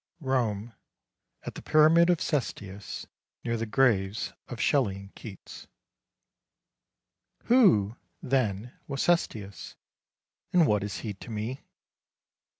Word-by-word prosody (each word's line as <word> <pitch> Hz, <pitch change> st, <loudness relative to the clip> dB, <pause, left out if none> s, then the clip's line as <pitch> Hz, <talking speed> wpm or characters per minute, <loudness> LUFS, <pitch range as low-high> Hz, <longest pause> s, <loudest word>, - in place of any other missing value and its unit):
ROME 120 Hz, -6 st, -1 dB, 0.7 s
AT -, -, -6 dB
THE -, -, -8 dB
PYRAMID 160 Hz, +3 st, +5 dB
OF 175 Hz, -2 st, +3 dB
CESTIUS 105 Hz, -, -3 dB, 0.4 s
NEAR 115 Hz, -, -1 dB
THE 115 Hz, 0 st, -3 dB
GRAVES 105 Hz, -4 st, +1 dB
OF 120 Hz, -, -7 dB
SHELLEY 125 Hz, -10 st, +2 dB
AND 100 Hz, 0 st, -11 dB
KEATS 105 Hz, -4 st, -11 dB, 1.8 s
Who, 125 Hz, -, +4 dB, 0.2 s
then, 120 Hz, -3 st, -1 dB
was 135 Hz, -1 st, -2 dB
Cestius, 105 Hz, -, -1 dB, 0.8 s
And 175 Hz, -3 st, +6 dB
what 105 Hz, -7 st, +2 dB
is 105 Hz, -, -4 dB
he 105 Hz, -, -4 dB
to 100 Hz, -, -12 dB
me? 115 Hz, +5 st, -4 dB
115 Hz, 110 wpm, -28 LUFS, 100-140 Hz, 1.8 s, And